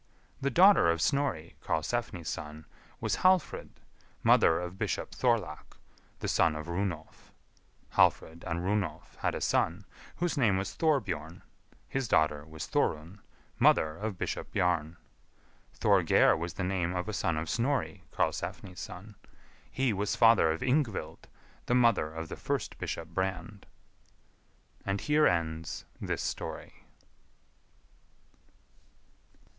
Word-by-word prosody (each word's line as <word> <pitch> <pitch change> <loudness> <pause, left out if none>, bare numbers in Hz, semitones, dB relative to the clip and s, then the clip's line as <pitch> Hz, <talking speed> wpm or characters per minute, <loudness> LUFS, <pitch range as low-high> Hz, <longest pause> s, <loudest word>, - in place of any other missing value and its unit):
The 140 - +1
daughter 185 - +6
of 85 0 +1
Snorri, 110 - -1
Karlsefni's 90 0 -2
son, 75 +1 -6 0.3
was - - -1
Hallfrid, 185 -3 +2 0.5
mother 80 - +5
of 90 +1 -6
Bishop - - -2
Thorlak, - - -1 0.4
the - - -2
son 80 -2 +2
of 75 - -5
Runolf. 85 -2 -4 0.6
(Hallfrid 80 +1 +2
and 85 +1 -2
Runolf) 100 -1 -2
had - - -1
a - - -4
son, 90 +4 0 0.3
whose 175 -3 -1
name 105 -7 +3
was 95 0 -3
Thorbjorn; 95 - -1 0.4
his 135 -2 -2
daughter 75 -5 +2
was 80 0 -6
Thorun, 80 +6 -1 0.4
mother 80 0 +4
of 105 +2 -4
Bishop - - -4
Bjarn. 85 -2 0 0.8
Thorgeir - - +4
was 85 +2 -5
the 95 - -3
name 90 -1 -1
of 90 +2 -2
a 110 - -3
son 85 -5 0
of 80 +1 -3
Snorri, 130 - -1
Karlsefni's 90 -3 -3
son; 100 +4 -8 0.6
he 130 -4 0
was 100 +1 -1
father 115 -8 +5
of 80 - -4
Yngvild, 130 -4 -1 0.4
the 120 - +2
mother 115 -11 +3
of 80 +1 -6
the - - -6
first - - -3
Bishop 85 0 -4
Brand. 95 +3 -4 1.2
And 100 0 -1
here 150 +4 +3
ends 80 0 -2 0.2
this - - -2
story. - - -6
90 Hz, 125 wpm, -30 LUFS, 80-115 Hz, 1.2 s, daughter